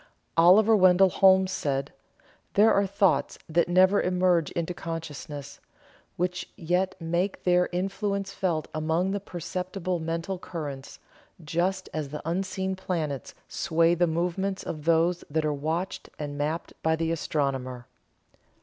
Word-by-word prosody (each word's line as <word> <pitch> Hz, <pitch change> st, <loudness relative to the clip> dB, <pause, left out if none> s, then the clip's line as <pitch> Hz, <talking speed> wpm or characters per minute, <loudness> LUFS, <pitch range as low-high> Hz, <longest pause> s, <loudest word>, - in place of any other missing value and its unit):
Oliver 200 Hz, +7 st, +6 dB
Wendall 185 Hz, -1 st, +5 dB
Holmes 190 Hz, 0 st, +5 dB
said: 140 Hz, -3 st, -2 dB, 0.6 s
"There 215 Hz, +2 st, +6 dB
are 200 Hz, 0 st, +2 dB
thoughts 190 Hz, -6 st, +1 dB
that 170 Hz, +2 st, +1 dB
never 185 Hz, +3 st, +5 dB
emerge 180 Hz, -3 st, +2 dB
into 170 Hz, +1 st, -2 dB
consciousness, 150 Hz, -4 st, -7 dB, 0.6 s
which 180 Hz, 0 st, -2 dB
yet 180 Hz, +3 st, -1 dB
make 175 Hz, +4 st, -1 dB
their 180 Hz, 0 st, +3 dB
influence 195 Hz, +2 st, -2 dB
felt 170 Hz, -6 st, -1 dB
among 160 Hz, +4 st, 0 dB
the 200 Hz, -, -1 dB
perceptible 185 Hz, 0 st, -4 dB
mental 165 Hz, +3 st, -3 dB
currents, 145 Hz, -7 st, -7 dB, 0.5 s
just 180 Hz, +5 st, -1 dB
as 155 Hz, -3 st, -3 dB
the 150 Hz, +2 st, -7 dB
unseen 190 Hz, +2 st, -2 dB
planets 160 Hz, -8 st, -3 dB
sway 165 Hz, -1 st, +2 dB
the 175 Hz, 0 st, +2 dB
movements 180 Hz, +4 st, -1 dB
of 155 Hz, -2 st, -6 dB
those 165 Hz, +1 st, +2 dB
that 155 Hz, +1 st, 0 dB
are 150 Hz, -, +1 dB
watched 160 Hz, +6 st, -3 dB
and 145 Hz, -1 st, -5 dB
mapped 150 Hz, +3 st, -3 dB
by 160 Hz, 0 st, +2 dB
the 165 Hz, 0 st, -1 dB
astronomer." 135 Hz, -6 st, -2 dB
175 Hz, 130 wpm, -27 LUFS, 160-185 Hz, 0.6 s, Oliver